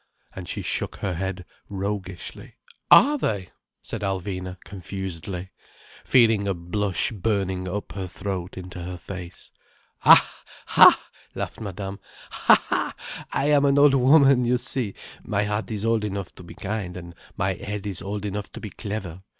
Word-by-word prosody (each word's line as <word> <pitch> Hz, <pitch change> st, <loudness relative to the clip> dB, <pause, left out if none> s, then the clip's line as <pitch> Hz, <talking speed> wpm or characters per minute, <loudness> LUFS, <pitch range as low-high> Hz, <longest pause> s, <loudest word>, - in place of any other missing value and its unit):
And 90 Hz, -2 st, -7 dB
she -, -, -3 dB
shook -, -, -2 dB
her 95 Hz, -, -3 dB
head 95 Hz, +1 st, -4 dB, 0.2 s
roguishly. 95 Hz, -2 st, -5 dB, 0.3 s
"Are 290 Hz, +3 st, +7 dB
they!" 100 Hz, -, -2 dB, 0.3 s
said -, -, -5 dB
Alvina 95 Hz, -2 st, -3 dB
confusedly, 95 Hz, -1 st, -6 dB, 0.5 s
feeling 115 Hz, -5 st, +4 dB
a 100 Hz, -, 0 dB
blush 95 Hz, +5 st, 0 dB
burning 95 Hz, -3 st, -1 dB
up 100 Hz, +3 st, -4 dB
her 95 Hz, -2 st, -5 dB
throat 95 Hz, 0 st, -5 dB
into 90 Hz, -1 st, -7 dB
her 90 Hz, +1 st, -5 dB
face. 90 Hz, -1 st, -9 dB, 0.5 s
"Ha—ha!" -, -, +6 dB, 0.4 s
laughed -, -, -5 dB
Madame. 100 Hz, -1 st, -5 dB, 0.3 s
"Ha -, -, +4 dB
ha! -, -, -1 dB, 0.4 s
I 145 Hz, +2 st, +1 dB
am 145 Hz, -1 st, +5 dB
an 140 Hz, 0 st, +4 dB
old 145 Hz, -1 st, +7 dB
woman, 135 Hz, -1 st, +6 dB
you 125 Hz, +1 st, +2 dB
see. 125 Hz, -4 st, -2 dB, 0.3 s
My 100 Hz, -, 0 dB
heart 105 Hz, -1 st, -2 dB
is 105 Hz, -1 st, -3 dB
old 115 Hz, -1 st, +2 dB
enough 100 Hz, -3 st, -4 dB
to -, -, -13 dB
be 85 Hz, -, -11 dB
kind, 100 Hz, -3 st, -4 dB
and 85 Hz, -1 st, -9 dB, 0.2 s
my 95 Hz, 0 st, +1 dB
head 100 Hz, +1 st, -6 dB
is 100 Hz, -4 st, -4 dB
old 100 Hz, +2 st, -4 dB
enough 100 Hz, 0 st, -4 dB
to -, -, -7 dB
be 105 Hz, -, -7 dB
clever. 100 Hz, -5 st, -6 dB
100 Hz, 155 wpm, -24 LUFS, 90-110 Hz, 0.5 s, Are